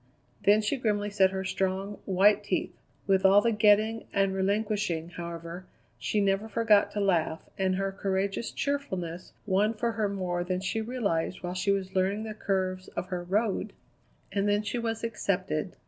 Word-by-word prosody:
Then 210 +2 +6
she 210 +7 0
grimly 210 -4 0
set 195 -2 +4
her 190 0 -3
strong, 190 +2 -2
white 195 +2 +4
teeth. - - -1 0.3
With 190 -1 +3
all 195 +1 +7
the 230 +3 +2
getting 215 +1 +3
and 195 -1 +2
relinquishing, 200 -3 0
however, 170 +1 -7 0.3
she 210 - 0
never 200 +2 +1
forgot 220 -2 +4
to 210 - -2
laugh, 170 -5 +1
and 190 -1 +1
her 195 +1 -1
courageous 195 +2 -1
cheerfulness 185 - -3
won 210 +3 +2
for 235 +2 0
her 215 -2 -1
more 180 -3 -2
than 180 0 -2
she 195 +4 -2
realized 200 -8 -2
while 175 0 -3
she 180 +2 -1
was 195 -1 0
learning 195 +3 +1
the 220 -1 -5
curves 185 -3 -2
of 185 - -3
her 180 -2 -3
Road. 205 +4 0 0.6
And 200 0 +1
then 205 +1 +2
she 225 +3 -2
was 225 -1 -3
accepted. 185 -7 -2
195 Hz, 170 wpm, -28 LUFS, 185-210 Hz, 0.6 s, all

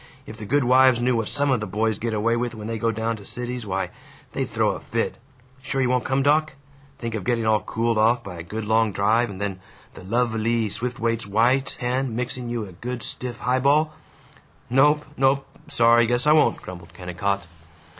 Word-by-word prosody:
If 110 - -10
the 105 -2 -8
good 145 +3 +2
wives 130 0 +5
knew 125 +1 +2
what 115 -2 -1
some 145 -1 +1
of 125 - +2
the 105 - -4
boys 110 0 -1
get 115 -1 -2
away 115 +2 +1
with 120 0 -2
when 105 -1 -8
they 115 0 -3
go 115 +1 +1
down 115 +1 -2
to - - -12
the - - -12
Cities, 125 -2 -5
why, 95 -1 -2 0.4
they'd - - -3
throw - - +2
a - - -5
fit! - - -3 0.4
Sure 135 +1 -3
you 125 -1 +2
won't 125 -1 +1
come, 135 +1 +1
doc? 155 +2 +2 0.4
Think 115 -1 -5
of 110 -4 -3
getting 115 +2 0
all 110 -1 +3
cooled 115 0 -1
off 115 +3 +3
by 90 -3 -8
a - - -4
good 105 +6 -5
long 110 0 +2
drive, 110 +5 +2
and 95 -2 -8
then 100 -2 -3 0.3
the - - -12
lov 115 +4 0
e - - -1 0.2
ly 110 - -2
Swiftwaite's 115 0 -2
white 120 +6 +2
hand 125 -1 -1
mixing 125 0 -3
you 120 -2 -3
a 95 - -11
good 120 +7 -6
stiff 125 -1 -4
highball!" 140 +5 +2 0.8
"Nope. 150 +3 +4
Nope. 135 +1 +2 0.2
Sorry. 120 -3 +4
Guess 120 +3 +1
I 150 - +5
won't," 150 -7 +4
grumbled 90 -1 -11
Kennicott. 95 +2 -2
115 Hz, 215 wpm, -24 LUFS, 110-125 Hz, 0.8 s, wives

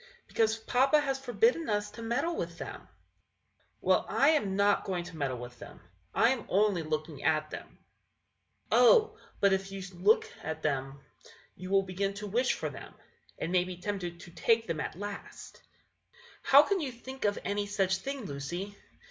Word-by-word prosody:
"Because 225 0 +1
papa 260 +6 +3
has 270 -2 -1
forbidden 330 - +1
us 205 0 -1
to 230 - -10
meddle 255 +9 -1
with - - -4
them." - - -6
Henry. - - -14 0.9
"Well, - - +2
I 280 - +4
am 245 -12 +2
not 200 0 +3
going 180 -3 -2
to 175 -1 -10
meddle 135 -5 -2
with 120 0 -9
them; - - -11 0.3
I 230 - +4
am 255 -5 -3
only 200 -2 +3
looking 155 -1 -4
at 155 0 +1
them." - - -7
Lucy. - - -26 0.9
"Oh! 445 -3 +5 0.2
but 200 -1 +4
if 195 0 -1
you 195 -1 -6
look 195 +5 +4
much - - -13
at 160 +1 -5
them, 135 -2 -2 0.5
you 185 +1 -8
will 195 0 +4
begin 195 +1 -2
to 210 +1 -6
wish 240 +6 +1
for - - -4
them, - - -11 0.4
and 165 - -3
may 180 -1 +4
be 180 -1 -7
tempted 180 -3 -4
to 175 - -12
take 225 +5 +2
them 165 -5 -3
at - - -4
last." 205 +1 -8
Henry. - - -37 0.3
"How 280 +2 +7
can 395 +5 0
you 285 -6 -3
think 260 +3 -9
of 205 -1 +1
any 205 0 -1
such 195 -2 +1
thing, 270 +3 -5
Lucy? 175 +7 -5
200 Hz, 190 wpm, -30 LUFS, 175-235 Hz, 0.9 s, How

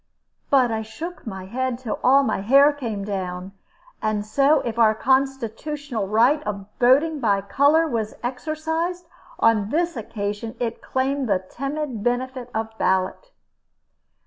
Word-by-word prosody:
But 255 -4 +4
I 220 0 -1
shook 310 +9 -8
my 190 -3 -6
head 255 +4 -2
till 245 -3 -4
all 275 +2 +6
my 265 - 0
hair 275 +7 +6
came 225 -8 -4
down; 185 -2 -4 0.5
and 215 -1 -1
so 275 +7 +3
if 235 -1 -4
our 220 -1 +5
constitutional 265 -1 -1
right 240 +9 +3
of 200 -4 -5
voting 285 +6 +4
by 200 -6 +2
color 285 +10 +3
was 225 -6 -2
exercised, 320 +7 -3 0.3
on 215 -3 +3
this 340 +4 0
occasion 210 0 -4
it 235 -1 -3
claimed 265 -1 -1
the 190 -2 +1
timid 275 -3 -4
benefit 250 +1 -2
of 220 0 -4
ballot. 190 - 0
245 Hz, 140 wpm, -23 LUFS, 215-280 Hz, 0.5 s, all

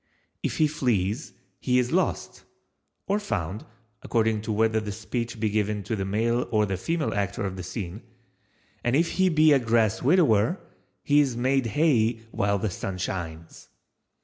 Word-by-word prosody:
If - - -2
he 155 - +4
flees 120 - -1 0.3
he 125 -1 +1
is 125 -1 +1
lost—(or 195 +2 -3
found, 105 - -3 0.4
according 110 -2 +1
to 110 - -4
whether 110 +1 +2
the 105 -1 -5
speech 115 +2 -4
be 110 - +1
given 105 -1 -1
to 110 +3 -2
the 95 -2 -3
male 115 +5 0
or 105 -2 +2
the 95 -1 -2
female 160 - -1
actor 100 -1 -2
of 95 -1 -3
the 95 - -6
scene,)—and 115 +6 -7
if 165 +3 +2
he 190 0 +2
be 155 -2 +5
a 140 - +5
grass 115 -3 +1
widower, 135 - +3 0.4
he 145 0 +4
is 135 -5 +1
made 130 0 +1
hay 120 -3 +3 0.2
while 100 0 +1
the 100 0 -2
sun 95 +1 -5
shines. 85 -3 -6
115 Hz, 160 wpm, -26 LUFS, 100-130 Hz, 0.4 s, be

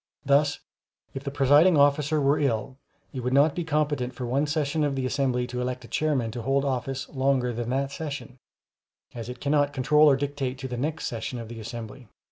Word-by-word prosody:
Thus, 145 +1 +3 0.6
if 135 - -6
the 140 - -3
presiding 145 +5 +5
officer 145 +2 +3
were 140 +1 +2
ill, 130 -2 -1 0.4
it 130 - -4
would 125 +1 -2
not 145 +2 +5
be 175 - -3
competent 145 -5 -1
for 125 - -4
one 135 +5 0
session 150 0 0
of 145 -2 0
the 130 -1 -2
assembly 130 -2 0
to 125 0 -4
elect 125 0 -4
a - - -12
chairman 135 -7 0
to 120 +1 -5
hold 135 +4 +1
office 135 0 -2
longer 130 -2 +1
than 120 0 -4
that 135 +2 -1
session, 140 -4 -6 0.7
as 115 -1 -7
it 125 0 -7
cannot 145 +1 +1
control 150 +3 +5
or 140 - +5
dictate 135 -2 -3
to 130 0 -5
the 125 - -5
next 150 +6 -3
session 115 +2 -4
of 115 -2 -7
the 115 -1 -8
assembly. 115 +2 -8
135 Hz, 205 wpm, -26 LUFS, 125-145 Hz, 0.7 s, presiding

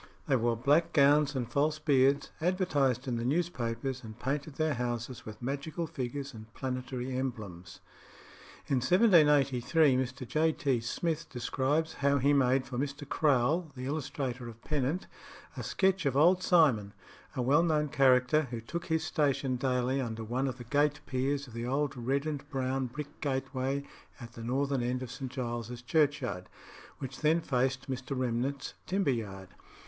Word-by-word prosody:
They 140 - +2
wore 120 -1 +1
black 150 +8 +3
gowns 145 0 +4
and 125 -3 -1
false 150 +4 +1
beards, 140 -2 +3
advertised 145 - +1
in 120 -2 -1
the 115 - -2
newspapers, 130 -4 -1
and 110 -1 -9
painted 140 +3 -3
their 155 0 +1
houses 120 -1 -4
with 110 - -8
magical 145 +6 -3
figures 140 -1 -5
and 110 0 -11
planetary 125 0 -4
emblems. 100 -9 -5 0.8
In 135 - +1
1783 150 - +4
Mr. 130 0 -3
J. 160 +3 +2
T. 135 -6 0
Smith 165 +7 -2
describes 140 +5 -1
how 140 0 +2
he 140 +2 +3
made 130 -1 +3
for 125 -1 -4
Mr. 140 +1 -4
Crowle, 150 +4 +2
the 125 0 -6
illustrator 135 -4 -3
of 115 0 -13
Pennant, 150 +5 -1 0.5
a - - -5
sketch 190 -4 +1
of 135 0 0
Old 180 +5 +5
Simon, 135 - +3 0.4
a 125 - 0
well 140 +6 +4
known 155 -3 +2
character, 135 +1 +4
who 120 -1 -4
took 170 +10 -6
his 160 -1 +1
station 140 -4 0
daily 125 +1 0
under 115 -2 -4
one 125 +5 -1
of 130 -1 -4
the 120 - -8
gate 145 +4 +1
piers 135 +2 -1
of 120 - -14
the 115 +1 -4
old 140 +2 0
red 135 +4 -1
and 145 -2 -4
brown 130 -1 -1
brick 145 +4 -8
gateway 135 0 -1 0.4
at 120 -2 -9
the 115 - -9
northern 135 +2 0
end 125 +1 -1
of 125 - -7
St. 130 -3 -6
Giles's 120 -2 -4
Churchyard, 140 - 0 0.5
which 135 -1 -7
then 160 +2 +3
faced 130 -2 -1
Mr. 130 0 -4
Remnent's 130 +2 -2
timber 190 -6 +1
yard. 95 -6 -5
135 Hz, 165 wpm, -31 LUFS, 125-150 Hz, 0.8 s, Old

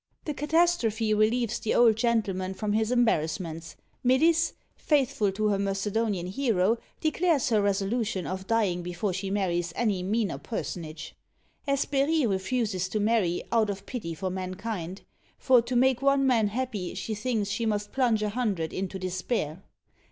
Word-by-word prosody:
The 300 - -2
catastrophe 290 -8 +2
relieves 220 +2 +1
the 220 - -1
old 230 -2 +6
gentleman 205 -5 0
from 210 +1 -2
his 220 +2 +1
embarrassments. 165 -8 0 0.3
Melisse, 320 +6 +3 0.2
faithful 270 -8 +1
to 215 +2 0
her 200 -1 +1
Macedonian 200 0 -1
hero, 215 0 +1 0.2
declares 320 -3 +2
her 215 -3 +3
resolution 200 0 0
of 190 +1 -5
dying 205 -6 +1
before 180 +3 -3
she 190 +2 -3
marries 175 -4 0
any 210 -6 0
meaner 210 +3 -1
personage. 165 -8 -6 0.5
Hesperie 280 +2 +1
refuses 195 -2 -1
to 215 - -1
marry, 205 -5 +1
out 225 -2 +3
of 195 -1 -5
pity 185 -10 -5
for 190 +2 -3
mankind; 185 0 -5 0.4
for 255 -2 +5
to 245 +2 -4
make 255 0 +3
one 275 0 +3
man 235 -5 +3
happy 215 -4 -3
she 220 - -3
thinks 215 -1 -1
she 225 +3 -1
must 205 -1 -1
plunge 235 -5 +2
a 210 - 0
hundred 205 -8 -2
into 190 0 -3
despair. 185 -2 -3
215 Hz, 150 wpm, -27 LUFS, 190-245 Hz, 0.5 s, old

